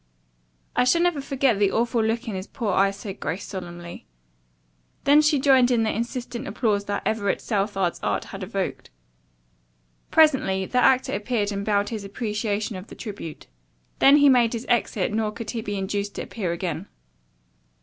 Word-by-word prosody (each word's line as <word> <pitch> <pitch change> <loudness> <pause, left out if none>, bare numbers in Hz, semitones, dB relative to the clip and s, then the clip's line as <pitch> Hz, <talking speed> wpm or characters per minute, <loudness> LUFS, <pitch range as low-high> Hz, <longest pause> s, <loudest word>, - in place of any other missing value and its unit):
"I - - +4
shall 335 +7 +3
never 350 -5 +1
forget 270 -5 +1
the 200 -1 +3
awful 230 0 +1
look 225 +2 -1
in 220 - -3
his 190 +2 -5
poor 220 -7 -2
eyes," 195 +1 +2
said 200 -1 -7
Grace 160 +6 -3
solemnly. 175 -2 -8 1.0
Then 290 +2 +6
she 300 -1 +3
joined 260 -2 +5
in 235 -3 +2
the 220 - 0
insistent 240 +1 -4
applause 205 -1 0
that 205 0 -3
Everett 205 -2 0
Southard's 195 -4 -1
art - - -1
had - - -9
evoked. - - -4 1.2
Presently 265 -12 +3
the 250 - 0
actor 260 -1 +3
appeared 210 -1 -1
and 200 0 -3
bowed 205 -1 +1
his 220 -3 -5
appreciation 210 0 -3
of 185 +3 -8
the - - -11
tribute. 200 -8 -8 0.5
Then 275 +2 +7
he 290 -1 +6
made 245 -4 +4
his 230 +1 -4
exit 220 -4 0
nor 215 -1 0
could 225 +1 -6
he 230 - -3
be 205 -1 -4
induced 200 +1 -3
to - - -4
appear 190 -7 -3
again. 170 +1 -4
215 Hz, 170 wpm, -24 LUFS, 200-245 Hz, 1.2 s, Then